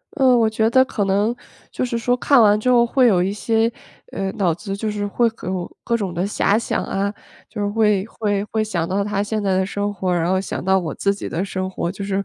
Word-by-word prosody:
呃， 260 -3 +4
我 225 - +3
觉 220 0 +1
得 260 +2 +5
可 210 -5 -2
能 205 +4 +1 0.4
就 - - -3
是 245 -2 -1
说 245 +2 +1
看 275 +1 +4
完 210 -1 +5
之 250 - 0
后 240 -1 +5
会 250 +1 +3
有 190 -6 +3
一 195 +2 -1
些 225 +2 +1 0.4
呃， 195 -1 -3
脑 180 -5 +1
子 195 +3 -5
就 215 +1 -2
是 205 -1 -3
会 235 +4 +2 0.2
有 185 -1 -4
各 235 0 0
种 195 -5 -3
的 175 +2 -1
遐 205 0 +2
想 230 - -2
啊， 200 +1 -1 0.4
就 215 - -8
是 205 - 0
会 210 -2 +2
会 205 -2 -2
会 220 -1 +1
想 175 -6 -2
到 200 +2 0
他 200 -1 -1
现 210 0 -2
在 190 -1 +1
的 190 - +1
生 205 +1 -2
活， 185 -2 -2
然 170 -1 0
后 190 0 +2
想 195 - -5
到 190 +1 +3
我 170 -6 -3
自 200 0 0
己 - - -6
的 175 - -2
生 185 -1 -3
活， 175 -2 -3
就 195 +1 -6
是 195 0 -1
205 Hz, 270 characters per minute, -21 LUFS, 190-225 Hz, 0.4 s, 得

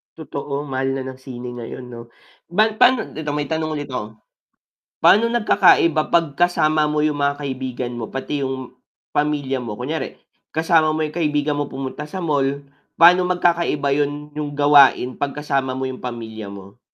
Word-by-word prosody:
Totoo 145 -2 -5
mahal 135 -1 -2
na 135 - -3
ng 130 0 -8
sine 125 -2 -8
ngayon 125 +1 -8
no, 115 0 -9 0.4
ba 215 +6 +2
pano 250 -3 +5
dito 150 -1 -4
may 150 +1 -3
tanong 155 -1 -1
ulit 145 -2 -5
ako, 110 -3 -5 0.8
pano 225 +3 +5
nagkakaiba 170 -8 +4
pag 165 -4 +2
kasama 155 -1 +2
mo 150 0 0
yung 150 -1 0
mga 140 0 +1
kaibigan 130 -2 -4
mo 120 -2 -5
pati 135 +2 -4
yung 130 -2 -4 0.4
pamilya 145 -3 0
mo? 115 -4 -6
Kunyari 145 +7 -4 0.4
kasama 160 -1 +3
mo 155 - 0
yung 155 - -4
kaibigan 150 -3 0
mo 145 - -2
pumunta 135 +2 -6
sa 185 +3 -5
mall, 140 -2 0 0.3
pano 180 +2 +6
magkakaiba 170 -5 +1
yun 145 +1 -2
yung 145 -1 -5
gawain 140 -3 +5
pag 140 0 -2
kasama 135 -3 -1
mo 130 - -3
yung 130 -1 -5
pamilya 110 -4 -6
mo? 100 +2 -12
145 Hz, 165 wpm, -21 LUFS, 130-155 Hz, 0.8 s, pano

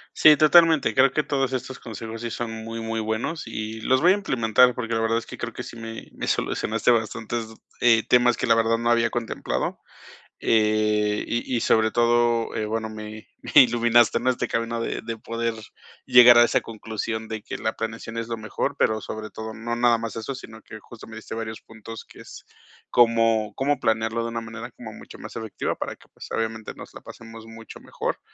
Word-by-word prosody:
Sí, 155 -1 +7
totalmente. 160 0 +5
Creo 135 0 +4
que 155 - +1
todos 135 -2 -1
estos 130 0 -4
consejos 115 0 -8
sí 120 - -3
son 120 0 -4
muy, 115 +1 -6
muy 115 0 -3
buenos, 110 +9 -3
y 110 0 -5
los 130 +3 +2
voy 175 +3 +6
a - - +4
implementar 125 - +3
porque 115 -2 -4
la 115 - +1
verdad 115 0 +1
es 115 - -4
que - - -10
creo - - -5
que - - -6
sí, - - -10
me 115 0 -8
me - - -5
solucionaste 115 +3 0
bastantes 115 0 -2 0.3
eh, 115 -2 +4
temas 125 -1 +4
que - - -2
la 115 - +4
verdad 115 0 +2
no 120 +1 -1
había 115 -1 +3
contemplado. 115 -1 -3 0.6
Eh, 105 -1 +2
y 120 +2 -2
y - - +1
sobre 110 -1 +2
todo, 120 0 +2
eh, 110 - -1
bueno, 110 +1 -3
me 110 0 -9 0.2
me - - +7
iluminaste 120 -1 +3
en 125 - -4
este 130 -1 +1
camino 115 0 -2
de - - -3
de 115 0 -5
poder 115 +1 -3 0.5
llegar 120 -1 +8
a 120 - +8
esa - - +1
conclusión 110 0 -5
de 110 -1 -5
que - - -6
la 110 - -2
planeación 115 0 -5
es 115 -1 -3
lo 115 -1 -4
mejor, 110 -2 -3
pero 110 0 +2
sobre 110 0 -6
todo 110 0 -7
no 115 +2 -4
nada 120 0 +3
más 115 -2 -5
eso, 115 +4 -4
sino 110 -4 -11
que 110 - -11
justo 115 +2 -13
me 110 - -11
diste 110 - -8
varios 110 -1 -6
puntos, 115 0 -11
que - - -15
es - - -12 0.4
cómo 115 -3 +3
cómo 145 +2 0
planearlo 110 +1 0
de 115 - -3
una 115 0 -4
manera 115 +2 -8
como 110 -2 -10
mucho - - -13
más - - -10
efectiva, 110 -2 -3
para - - -5
que, - - -22
pues, - - -11
obviamente 110 -1 -3
nos - - -12
la - - -10
pasemos 115 -1 -12
mucho 115 0 -12
mejor - - -4
115 Hz, 210 wpm, -24 LUFS, 110-120 Hz, 0.6 s, llegar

